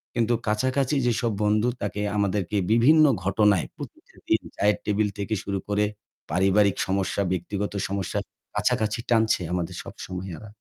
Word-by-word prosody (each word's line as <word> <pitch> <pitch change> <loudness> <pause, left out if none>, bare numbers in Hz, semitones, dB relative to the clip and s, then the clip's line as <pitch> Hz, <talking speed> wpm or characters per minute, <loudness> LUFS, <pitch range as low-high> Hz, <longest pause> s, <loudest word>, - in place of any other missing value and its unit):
কিন্তু 120 0 +2
কাছাকাছি 130 +6 +1
যেসব 120 -1 +1
বন্ধু 105 +3 +2
তাকে 105 0 -3 0.2
আমাদেরকে 100 0 0
বিভিন্ন 150 +7 +6 0.2
ঘটনায় 100 -2 +3
প্রতিটা - - -11
দিন - - +3
চায়ের 105 0 +2
টেবিল 105 0 +1
থেকে 105 +2 -3
শুরু 100 -1 -2
করে 105 0 +1 0.5
পারিবারিক 95 +3 +3
সমস্যা, 95 +1 0
ব্যক্তিগত 100 +3 -2
সমস্যার 95 -1 -2 0.3
কাছাকাছি 110 +2 +1
টানছে 110 -5 +3
আমাদের 85 -2 -2
সব - - -9
সময় 95 +1 -6
এরা। 110 - -11
105 Hz, 140 wpm, -25 LUFS, 100-110 Hz, 0.5 s, বিভিন্ন